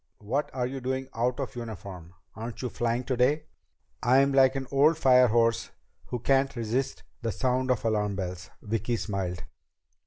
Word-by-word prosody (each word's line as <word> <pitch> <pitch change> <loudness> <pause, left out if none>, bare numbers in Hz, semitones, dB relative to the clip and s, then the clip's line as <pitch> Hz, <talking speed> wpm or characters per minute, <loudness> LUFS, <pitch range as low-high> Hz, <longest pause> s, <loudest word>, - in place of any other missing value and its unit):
"What 130 +8 -2
are 125 -2 -1
you 135 +1 -4
doing 130 +1 -2
out 120 +3 0
of 135 -1 -4
uniform? 95 -7 -8 0.2
Aren't 115 +3 -6
you 125 - -1
flying 120 +2 -1
today?" 130 +4 +1 0.6
"I'm 135 +3 +4
like 135 -1 +5
an 135 -1 -2
old 145 +4 +5
firehorse 120 -4 +4 0.4
who 125 - -3
can't 135 +3 +2
resist 120 +3 -2 0.2
the 115 -2 -1
sound 130 +5 0
of 125 -3 +1
alarm 105 -2 +1
bells." 90 -1 -5
Vicki 115 +2 -1
smiled. 95 -3 -3
120 Hz, 155 wpm, -28 LUFS, 110-130 Hz, 0.6 s, like